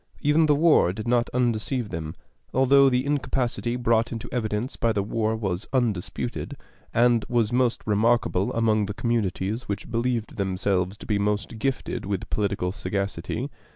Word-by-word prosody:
Even 155 +2 +4
the 150 - +4
war 150 - +4
did 110 +3 -6
not 120 0 +2
undeceive 120 -1 0
them, 80 -1 -5 0.4
although 135 +1 +6
the 125 +1 +1
incapacity 130 -4 -1
brought 115 -1 +1
into 115 0 -5
evidence 110 0 -2
by 115 - +1
the 100 -2 0
war 110 +1 -1
was 95 -3 -3
undisputed, 115 -9 -2 0.3
and 120 -1 +3
was 120 -2 +1
most 125 -1 +1
remarkable 115 -2 +2
among 110 -3 +2
the 105 - -5
communities 110 -1 -1
which 100 +2 -4
believed 115 -1 -1
themselves 95 0 0
to - - -11
be 105 -2 0
most 105 +2 -1
gifted 120 -4 -2
with 100 -2 -3
political 100 -3 0
sagacity. 100 - -3
115 Hz, 155 wpm, -25 LUFS, 100-125 Hz, 0.4 s, although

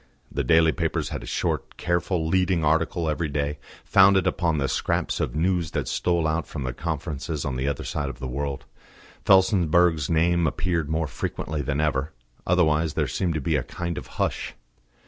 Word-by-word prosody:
The 70 - -1
daily 80 +4 +5
papers - - -2
had - - -5
a - - -9
short, - - -2
careful 85 -1 0
leading 90 -1 +2
article 80 +2 +1
every 80 +1 -1
day, 70 0 -2 0.3
founded 95 -1 +5
upon 85 -3 +1
the 70 -2 0
scraps - - -1
of - - -2
news 85 0 +1
that - - -2
stole 85 -2 0
out 80 -1 0
from 70 - -5
the 65 -1 -3
conferences 70 +2 -4
on 70 -3 -2
the 65 +2 -2
other 70 -2 -2
side 70 -2 -3
of - - -8
the 65 - -6
world; 70 +2 -4 0.6
Felsenburgh's 90 -5 +4
name 85 +1 +2
appeared 85 0 -1
more 80 +1 0
frequently 75 +1 -4
than 70 +1 -2
ever: 75 -1 0 0.3
otherwise 80 -3 +2
there 75 - +1
seemed 85 +6 -1
to 80 - -1
be 80 +3 0
a 70 - +2
kind 85 +6 -5
of - - -7
hush. - - -2
80 Hz, 185 wpm, -25 LUFS, 70-85 Hz, 0.6 s, daily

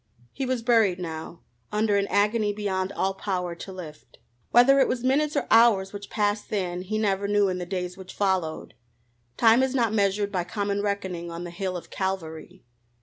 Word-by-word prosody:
He 265 -1 -3
was 250 -2 -1
buried 225 -6 +3
now 165 -1 -6 0.3
under 210 -1 +1
an 200 0 +1
agony 210 0 +1
beyond 195 -2 -2
all 195 -1 0
power 185 -3 -3
to 170 +3 -9
lift. 165 -5 -11 0.3
Whether 270 +3 +6
it 270 - +4
was 250 -1 -2
minutes 290 +4 +1
or - - 0
hours 220 -4 +5
which 200 0 -8
passed 210 -1 -1
then, 180 -4 -2
he 205 +4 -3
never 200 -2 0
knew 205 -1 +3
in 180 0 -2
the 175 - -5
days 180 -1 -4
which 190 -1 -11
followed. 185 - -1 0.6
Time 230 +2 +5
is 265 0 0
not 230 -4 +1
measured 200 -1 +1
by 180 -3 -1
common 200 +2 -2
reckoning 190 -4 -3
on 170 +1 -6
the 175 - -7
hill 185 0 -3
of 175 - -11
Calvary. 185 -2 -4
200 Hz, 190 wpm, -26 LUFS, 180-215 Hz, 0.6 s, Whether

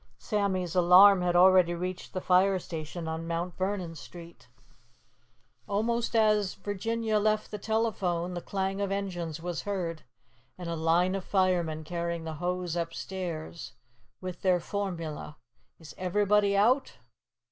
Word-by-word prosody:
Sammy's 190 -5 -1
alarm 180 +2 +7
had 175 0 +1
already 180 -1 +6
reached 180 +1 -5
the 185 - -3
fire 190 +2 +4
station 165 -1 -6
on 160 +1 -4
Mt. 170 +1 -3
Vernon 185 -3 -2
Street. 165 -1 -12 1.2
Almost 230 +4 -1
as 210 -3 +3
Virginia 215 +2 -1
left 215 0 0
the 210 - -5
telephone, 195 -6 -1
the 175 - -4
clang 195 +1 -2
of 200 - 0
the 195 - 0
engines 175 -5 -4
was 175 -1 -3
heard, 175 -5 -3 0.6
and 175 -2 -7
a 170 - -2
line 165 +3 +2
of 195 -1 -3
firemen 175 -5 +1
carried 170 0 -3
the 160 - -4
hose 180 -1 -2
upstairs, 170 - -5 0.5
with 185 -2 -7
their 185 -2 +3
formula, 165 -6 -5 0.4
"Is 160 -2 -12
everybody 200 +2 +2
out?" 250 +7 +3
180 Hz, 135 wpm, -29 LUFS, 170-200 Hz, 1.2 s, alarm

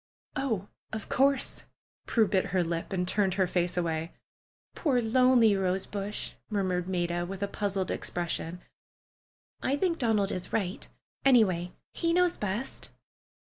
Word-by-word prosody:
"Oh, 230 -8 -1 0.2
of 220 -1 -5
course 275 0 +2 0.2
!" - - -63
Prue 225 -3 +3
bit 190 -1 +2
her 185 -2 +1
lip 165 +2 -3
and 180 -2 -1
turned 190 -1 +2
her 190 -1 +3
face 175 0 0
away. 165 -1 -1 0.6
"Poor, 275 -7 +1
lonely 240 -2 +5
rosebush!" 195 +2 -2 0.2
murmured 185 -4 0
Maida, 175 -1 0
with 195 +2 -5
a - - +1
puzzled 200 -2 -2
expression. 175 0 -3 1.0
"I 275 +2 +1
think 335 +1 0
Donald 215 -5 +2
is 180 - -4
right. 190 -4 -2 0.4
Any 255 -4 +7
way, 180 -2 -2 0.2
he 335 -1 0
knows 360 0 +3
best." 210 +6 -4
195 Hz, 140 wpm, -29 LUFS, 180-235 Hz, 1.0 s, Any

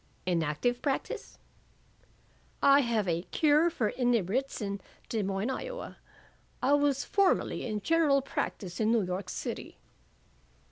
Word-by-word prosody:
"In 175 -2 +1
active 160 +11 -1
practise?" 275 -2 -3 1.3
"I 280 0 +7
have 230 -6 +1
a 170 -1 0
Cure 310 +1 +4
for 240 -10 -1
Inebriates 245 +1 0
in 200 -2 -3 0.3
Des 225 - 0
Moines, 195 +5 -1
Iowa. - - -6 0.6
I 275 - +2
was 285 -1 +2
formerly 395 -9 +1
in 210 -2 -3
general 300 -1 +3
practise 185 -8 -4
in 220 0 +2
New 230 -3 +3
York 185 +2 -4
City." - - -5
240 Hz, 130 wpm, -30 LUFS, 200-285 Hz, 1.3 s, I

